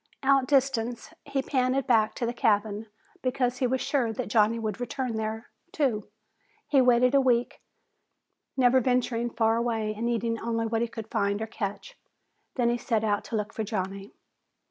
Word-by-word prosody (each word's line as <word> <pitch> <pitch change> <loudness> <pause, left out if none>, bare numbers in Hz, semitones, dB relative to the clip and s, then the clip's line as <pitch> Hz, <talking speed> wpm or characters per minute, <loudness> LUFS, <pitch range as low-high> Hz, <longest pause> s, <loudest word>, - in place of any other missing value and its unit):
Outdistanced, 265 -3 +1
he 270 -1 -1
panted 260 0 +1
back 220 -3 +3
to 240 - -2
the 235 - -2
cabin 215 -3 +1 0.3
because 250 -1 0
he 255 - +2
was 260 +1 -1
sure 255 -6 0
that 210 - -4
Johnny 215 +1 +3
would 215 -2 -3
return 250 -1 -3
there, 220 +1 -4 0.2
too. 235 -10 -1 0.6
He 275 -3 +4
waited 250 +1 +4
a 275 - +5
week, 245 -2 +1 1.0
never 255 0 +5
venturing 245 -1 0
far 225 -1 +1
away 225 -2 -1
and 230 +3 -2
eating 230 -1 -1
only 230 0 -1
what 225 0 -1
he 235 - +1
could 225 -1 -9
find 200 0 0
or 220 - -2
catch. 220 - -6 0.6
Then 240 -2 +2
he 240 - -1
set 225 -3 0
out 205 -2 0
to - - -4
look 210 +1 -2
for 220 - -3
Johnny. 195 -1 -4
235 Hz, 170 wpm, -27 LUFS, 220-250 Hz, 1.0 s, a